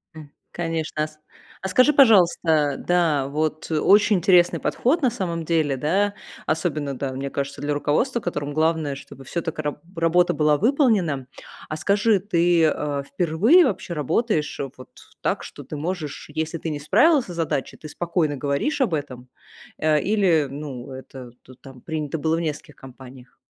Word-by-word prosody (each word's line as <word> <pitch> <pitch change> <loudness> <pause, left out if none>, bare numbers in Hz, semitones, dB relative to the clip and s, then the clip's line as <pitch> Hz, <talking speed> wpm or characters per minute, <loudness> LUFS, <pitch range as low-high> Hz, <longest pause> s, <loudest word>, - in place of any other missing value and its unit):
М, 150 -2 -11 0.2
конечно, 165 -2 -2
а, - - -2
с 155 0 -20 0.4
А 190 - -2
скажи, 255 +9 +5
пожалуйста, 175 - +4
да, 160 -6 +1
вот 155 +2 -3
очень 205 +6 +4
интересный 175 0 +4
подход 300 +7 0
на 255 - +3
самом 170 -6 -3
деле, 155 -4 +1
да, 190 +10 0 0.3
особенно, 155 -4 -1
да, 135 0 -3
мне 135 +1 -4
кажется, 140 0 -4
для 145 0 -1
руководства, 195 - 0
которому 145 -7 -4
главное, 155 -2 +1
чтобы 135 0 -12
всё 170 - -3
так 160 -1 -5
и - - +1
раб 150 0 -3 0.2
работа 165 +2 +2
была 150 -1 +3
выполнена. 215 - +2 0.4
А 155 - -4
скажи, 205 +3 +2
ты, 175 -3 +2
а, 145 -2 -2
впервые 180 - +3
вообще 190 -8 -3
работаешь 155 - -1 0.2
вот 130 - -12
в - - -20
так, - - -1
что - - -10
ты - - -8
можешь, 155 -2 -5
если 160 +2 -3
ты 165 - -4
не 150 -2 -4
справился 265 - +3
с - - -10
задачей, 155 -5 -2
ты 155 - -10
спокойно 165 -4 -1
говоришь 145 - -1
об 210 -10 +1
этом, 130 -4 -5 0.5
а, 155 -1 +3
или, 180 -4 +2
ну, 135 -2 -7
это 130 -1 -10
ту 130 - -16
там 135 -1 -14
принято 155 -1 -4
было 160 +2 +1
в - - -2
нескольких 150 -1 -5
компаниях? 130 -1 -14
155 Hz, 170 wpm, -23 LUFS, 145-180 Hz, 0.5 s, скажи